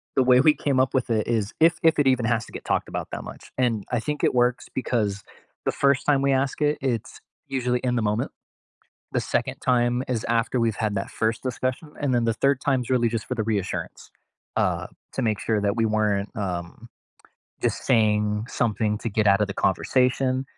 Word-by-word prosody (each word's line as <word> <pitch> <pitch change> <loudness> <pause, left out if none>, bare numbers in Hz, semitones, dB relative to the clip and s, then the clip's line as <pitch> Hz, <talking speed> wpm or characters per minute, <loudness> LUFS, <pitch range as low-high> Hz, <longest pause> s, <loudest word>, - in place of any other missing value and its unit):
the 130 - +4
way 125 0 +6
we 150 +1 +6
came 135 -3 0
up 130 - +2
with 130 -2 0
it 110 -2 0
is, 110 -3 0
if 165 +1 +5
if 160 -1 +4
it 140 - +3
even 125 -3 +3
has 115 -1 +1
to - - -15
get - - -7
talked - - 0
about - - -4
that - - -5
much, - - -11
and 115 -5 +1
I 125 - +1
think 150 +5 -4
it - - +3
works 125 0 +1
because 105 -6 -1 0.4
the - - +2
first 140 -1 +2
time 140 -2 +3
we 140 0 +2
ask 135 +2 0
it, 150 0 +2
it's 120 -5 -2 0.3
usually 125 -2 0
in 125 -1 +1
the - - +1
moment. 105 +1 -1 0.8
The - - +2
second - - -1
time 120 0 +2
is 120 -4 -1
after 115 +2 +1
we've 115 -3 +1
had 110 -2 -1
that 100 - -3
first 110 +1 -1
discussion, 130 +4 -3
and 140 -3 0
then 120 -1 +2
the 115 - +2
third 140 +1 +2
time's 130 -4 0
really 120 -2 +3
just 115 -1 -3
for 125 - -1
the 110 - -1
reassurance, 105 -4 -3 0.5
uh, - - +1 0.3
to 135 - -2
make 110 -3 0
sure 110 -2 0
that 100 +2 +1
we 115 - +2
weren't, 105 -2 +1
um, 90 +3 -4 0.8
just - - -1
saying 105 -2 +2
something 105 -2 0
to 115 - -3
get 105 +1 +1
outta 100 +1 +4
the 100 - -6
conversation, 130 +6 +1
120 Hz, 210 wpm, -24 LUFS, 110-130 Hz, 0.8 s, way